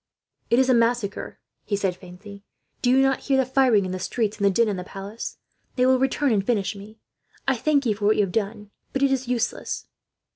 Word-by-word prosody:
"'"It 235 - +3
is 260 0 +4
a 260 - +4
massacre," 230 -3 0 0.3
he 205 - -1
said, 195 -3 -1
faintly. 200 +3 -12 0.4
"Do 245 - +2
you 265 +2 +5
not 270 -1 +2
hear 275 -2 +1
the 265 - +3
firing 250 -6 +3
in 185 - -4
the 185 - -4
streets, 215 +2 -2
and 200 - -4
the - - +5
din 230 +4 +2
in 205 - -1
the 180 - -5
palace? 195 +4 -7 0.4
They 250 - +3
will 260 0 +4
return 270 +1 +1
and 205 -3 +2
finish 205 -2 0
me. 205 +2 -12 0.5
I 270 - +3
thank 280 +3 +1
you 220 - +2
for 205 0 -4
what 215 +1 +4
you 210 - +3
have 190 - -3
done, 210 0 -3 0.2
but 270 - 0
it 275 - +3
is 260 -1 -1
useless." 245 -2 -2
225 Hz, 230 wpm, -24 LUFS, 200-260 Hz, 0.5 s, you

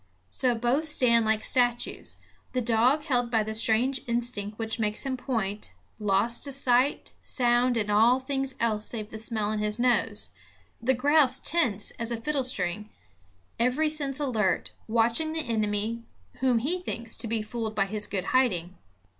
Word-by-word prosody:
So 250 -2 +1
both 250 +7 0
stand 235 -5 +3
like 220 0 +1
statues; 245 -1 0 0.4
the 255 - +1
dog 240 +6 +2
held 245 -4 0
by 225 -2 +2
the 220 +1 -4
strange 230 +4 +2
instinct 235 -3 -2
which 225 +1 -3
makes 215 -1 0
him 270 -2 -2
point, 220 -6 -3 0.3
lost 210 +3 +1
to 280 - -2
sight, 260 0 +1
sound 245 -1 +2
and 210 -2 -1
all 230 +5 +5
things 270 0 -3
else 215 -2 0
save 215 -2 -4
the 220 - -5
smell 215 -1 -1
in 215 - -2
his 210 0 -1
nose, 245 0 +1 0.5
the 260 +3 +2
grouse 285 +1 +4
tense 245 - 0
as 230 0 -2
a 235 - -1
fiddlestring, 225 -8 -2 0.7
every 255 +6 +2
sense 285 -3 -1
alert, 220 -10 0 0.2
watching 235 +8 +1
the 320 - -1
enemy 215 0 -1 0.4
whom 255 -2 +2
he 305 +11 -1
thinks 235 -10 -4
to 230 - -1
be 225 -1 -1
fooled 220 0 -4
by 195 - +2
his 210 +1 -3
good 190 -3 -3
hiding. 190 -9 +1
235 Hz, 165 wpm, -27 LUFS, 215-260 Hz, 0.7 s, all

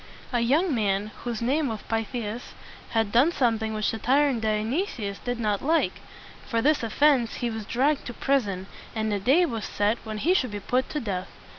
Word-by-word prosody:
A 240 - +3
young 290 +9 +2
man 205 -2 0
whose 235 -2 -2
name 280 +5 +1
was 220 -3 -4
Pyth´i 225 +2 -2
as 220 +4 -6 0.4
had 225 -3 0
done 255 +9 +5
something 225 -7 +1
which 215 -1 0
the 225 - -5
tyrant 270 -1 +3
Dionysius 220 - -1
did 245 -1 -3
not 210 -3 0
like. 320 +3 +1 0.5
For 230 -3 0
this 295 +6 +3
offense 245 +1 +3
he 240 -2 -2
was 220 -1 -5
dragged 280 +4 +1
to 240 - -5
prison, 205 -9 0 0.3
and 220 -1 0
a 200 - 0
day 275 - +4
was 230 -8 -3
set 210 +3 0
when 215 -1 -5
he 325 +12 +2
should 260 -9 +1
be 205 -1 -5
put 250 +6 0
to 300 - -2
death. 195 -7 -3
230 Hz, 195 wpm, -26 LUFS, 215-270 Hz, 0.5 s, done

